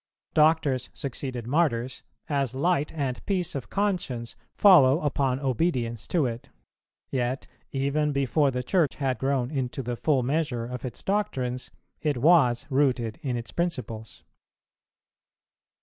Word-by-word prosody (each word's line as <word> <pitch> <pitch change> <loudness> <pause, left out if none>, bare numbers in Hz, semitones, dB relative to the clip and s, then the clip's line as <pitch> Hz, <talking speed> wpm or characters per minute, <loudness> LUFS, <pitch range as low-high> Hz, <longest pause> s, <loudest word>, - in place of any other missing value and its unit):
Doctors 150 -5 +3
succeeded 130 -3 -5
Martyrs, 130 -3 0 0.3
as 140 -4 -1
light 150 +1 +1
and 135 -6 -3
peace 180 -3 -1
of 135 -4 -5
conscience 175 - -2 0.2
follow 155 -8 +7
upon 135 -3 0
obedience 125 -5 -1
to 165 -6 +1
it; 120 -1 -5 0.6
yet, 130 0 -1 0.3
even 140 +2 0
before 140 +1 +2
the 125 -1 -2
Church 165 +1 +1
had 130 -5 -1
grown 135 -1 0
into 135 -2 -2
the 120 0 -3
full 135 +1 +1
measure 135 -3 -1
of 125 0 -6
its 125 - -7
doctrines, 130 -12 -1 0.3
it 150 -4 0
was 130 -4 +4
rooted 130 -5 +1
in 125 -4 -2
its 115 - -7
principles. 125 -11 -4
135 Hz, 130 wpm, -26 LUFS, 125-155 Hz, 0.6 s, follow